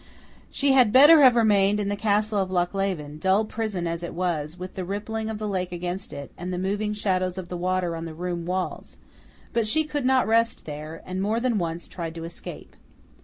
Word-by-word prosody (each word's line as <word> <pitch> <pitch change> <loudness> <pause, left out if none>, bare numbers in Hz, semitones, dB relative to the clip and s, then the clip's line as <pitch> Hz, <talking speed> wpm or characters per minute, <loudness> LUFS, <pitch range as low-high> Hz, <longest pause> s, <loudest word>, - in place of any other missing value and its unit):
She 280 -1 +1
had 255 -5 +5
better 295 +6 +8
have 255 -3 +7
remained 210 -3 +4
in 205 - -1
the 205 - 0
castle 210 0 +1
of 190 -1 -1
Lochleven, 175 -4 -1
dull 190 +5 +2
prison 215 -5 -3
as 170 0 -2
it 170 - -6
was, 170 -3 -2
with 185 0 -7
the 185 - -4
rippling 220 +4 -3
of 220 - -3
the 215 0 -4
lake 185 -3 -2
against 180 +2 -4
it, 140 - -8
and 180 +1 -4
the 180 - -2
moving 205 +3 -1
shadows 185 -3 -1
of 180 -2 -6
the 180 - -4
water 180 -1 -1
on 165 0 -5
the 160 -1 -7
room 175 0 -4
walls; 185 0 -3 0.6
but 230 -2 +1
she 315 +8 +2
could 295 -2 -3
not 260 -1 +4
rest 230 +1 +2
there, 155 +2 -7
and 185 +1 -3
more 215 +3 0
than 235 -3 +1
once 170 -1 -3
tried 165 -2 -6
to 165 - -6
escape. 165 +1 -8
190 Hz, 215 wpm, -25 LUFS, 175-215 Hz, 0.6 s, better